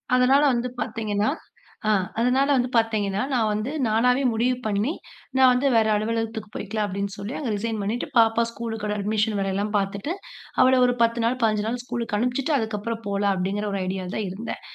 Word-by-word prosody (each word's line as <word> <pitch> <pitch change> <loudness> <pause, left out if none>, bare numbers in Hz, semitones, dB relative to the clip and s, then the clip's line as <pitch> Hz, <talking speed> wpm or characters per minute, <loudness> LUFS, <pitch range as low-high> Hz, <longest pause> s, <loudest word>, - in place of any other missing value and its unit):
அதனால 255 +3 +5
வந்து 240 +1 -1
பாத்தீங்கன்னா 215 0 -1 0.6
ஆஹ் 195 -3 +3
அதனால 250 +3 +3
வந்து 250 -1 +1
பாத்தீங்கன்னா, 215 -3 +1
நான் 230 -5 +2
வந்து 215 +5 -2 0.2
நானாவே 250 +4 +3
முடிவு 245 +3 +1
பண்ணி, 210 +5 0 0.5
நான் 260 -1 +7
வந்து 255 +3 +1
வேற 220 -1 +4
அலுவலகத்துக்குப் 220 0 -2
போயிக்கலாம், 210 +1 -2
அப்படின்னு 200 +1 -3
சொல்லி 200 +5 -5
அங்க 280 -6 -3
ரிசைன் 220 +1 -2
பண்ணிட்டு, 215 +5 -2
பாப்பாவ 230 0 +4
ஸ்கூல்க்கோட 225 -3 -4
அட்மிஷன் 210 +1 0
வேலைல்லாம் 195 +2 -1
பாத்துட்டு, 200 - -2 0.5
அவள 260 0 +5
ஒரு 245 - +2
10 230 0 +2
நாள், 245 +2 +1
15 215 -1 +2
நாள் 240 +2 -2
ஸ்கூல்க்கு 235 -3 -3
அனுப்பிச்சிட்டு, 250 +5 0
அதுக்கப்றம் 220 +1 -3
போலாம் 200 0 +1
அப்படிங்குற 200 +3 -1
ஒரு 200 - -1
ஐடியால 185 0 -4
தான் 215 -2 -2
இருந்தேன். 200 +6 -6
220 Hz, 170 wpm, -24 LUFS, 205-240 Hz, 0.6 s, நான்